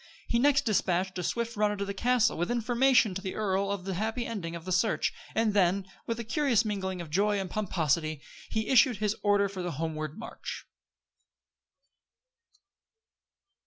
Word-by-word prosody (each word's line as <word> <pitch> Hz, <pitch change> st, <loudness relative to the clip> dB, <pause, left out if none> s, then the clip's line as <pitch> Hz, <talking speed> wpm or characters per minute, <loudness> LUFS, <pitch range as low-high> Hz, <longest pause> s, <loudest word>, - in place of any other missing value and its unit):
He 235 Hz, -, +1 dB
next 280 Hz, +2 st, +3 dB
dispatched 185 Hz, -3 st, 0 dB
a -, -, -3 dB
swift 235 Hz, +5 st, -2 dB
runner 210 Hz, 0 st, +1 dB
to 200 Hz, -, -2 dB
the 200 Hz, -, -4 dB
castle, 245 Hz, +2 st, +2 dB
with 175 Hz, +2 st, -1 dB
information 240 Hz, -1 st, +3 dB
to 190 Hz, -, -4 dB
the 190 Hz, -1 st, -5 dB
earl 195 Hz, -2 st, 0 dB
of 200 Hz, -2 st, -3 dB
the 195 Hz, -, -2 dB
happy 220 Hz, +6 st, -2 dB
ending 175 Hz, -7 st, -4 dB
of 170 Hz, 0 st, -8 dB
the 185 Hz, -, -4 dB
search; 195 Hz, +5 st, +1 dB, 0.2 s
and 220 Hz, -1 st, +2 dB
then, 195 Hz, -1 st, +2 dB, 0.2 s
with 230 Hz, 0 st, -2 dB
a -, -, -3 dB
curious 235 Hz, -1 st, +2 dB
mingling 190 Hz, -3 st, -3 dB
of 160 Hz, -3 st, -9 dB
joy 205 Hz, +4 st, +2 dB
and 190 Hz, -2 st, -4 dB
pomposity, 160 Hz, -6 st, 0 dB, 0.3 s
he 220 Hz, 0 st, -2 dB
issued 250 Hz, -3 st, +5 dB
his 210 Hz, +1 st, 0 dB
order 205 Hz, -1 st, +3 dB
for 195 Hz, -1 st, -6 dB
the 175 Hz, -1 st, -3 dB
homeward 155 Hz, 0 st, -4 dB
march. 225 Hz, -, -7 dB
200 Hz, 170 wpm, -29 LUFS, 185-225 Hz, 0.3 s, issued